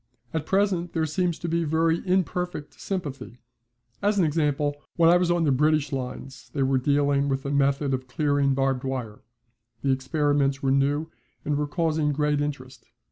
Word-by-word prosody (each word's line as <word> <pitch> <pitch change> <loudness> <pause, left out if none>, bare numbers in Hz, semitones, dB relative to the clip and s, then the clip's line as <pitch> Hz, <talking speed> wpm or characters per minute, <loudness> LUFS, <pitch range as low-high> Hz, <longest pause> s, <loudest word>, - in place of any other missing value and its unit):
At 160 -1 -2
present 190 -3 +1
there 160 -1 +1
seems 170 +2 -1
to 170 - -5
be 170 0 0
very 165 +1 +1
imperfect 180 -3 -1
sympathy. 145 - -5 0.6
As 205 +1 +1
an 185 - +4
example, 145 -2 0 0.2
when 165 -1 +5
I 175 - +6
was 180 -1 +1
on 175 -1 +2
the 150 - +3
British 150 +1 +2
lines 130 -1 -6
they 135 - +1
were 130 0 +2
dealing 140 +1 +2
with 135 0 -2
a 140 - -2
method 140 0 +1
of 130 0 -3
clearing 145 0 +1
barbed 135 -1 0
wire. 125 -5 -4 0.6
The 135 - +2
experiments 140 0 +1
were 135 - +2
new 145 +4 +1 0.3
and 150 - 0
were 150 0 -1
causing 155 -2 0
great 150 0 +1
interest. 130 -4 -5
145 Hz, 175 wpm, -25 LUFS, 135-165 Hz, 0.6 s, I